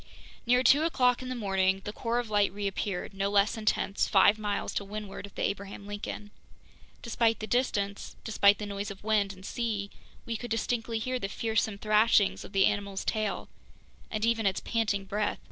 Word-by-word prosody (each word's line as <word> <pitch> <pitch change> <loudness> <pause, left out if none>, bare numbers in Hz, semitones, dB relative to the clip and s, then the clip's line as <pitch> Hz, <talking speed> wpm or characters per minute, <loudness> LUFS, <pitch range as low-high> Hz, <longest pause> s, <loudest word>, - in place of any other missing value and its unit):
Near 250 +1 +4
two 275 +4 +6
o'clock 255 -7 +2
in 255 - -6
the 255 - -3
morning, 195 -3 +1
the 210 - -5
core 230 +2 -1
of 245 -1 -1
light 205 -2 +3
reappeared, 200 -1 -3
no 195 0 -1
less 200 +1 +3
intense, 215 -2 0
five 205 +2 +5
miles 205 -1 -2
to - - -1
windward 205 0 -7
of 200 - -20
the - - -2
Abraham 200 0 -3
Lincoln. 205 0 -6 0.7
Despite 230 -1 +1
the 215 - -4
distance, 205 -5 -1
despite 205 -2 +4
the 210 - -5
noise 200 0 -4
of 200 0 -9
wind 210 -2 +2
and 190 -1 -12
sea, 210 -4 -2 0.3
we 230 -1 -3
could 240 - -7
distinctly 225 +1 -1
hear 255 +3 -2
the 195 - -3
fearsome 220 -1 -1
thrashings 215 -1 +3
of - - -11
the 195 -2 +4
animal's 200 -2 -1
tail, 215 -2 -1 0.6
and 215 0 -1
even 230 -2 +2
its 190 - 0
panting 210 -4 -1
breath. 205 +1 -1
210 Hz, 185 wpm, -29 LUFS, 200-225 Hz, 0.7 s, two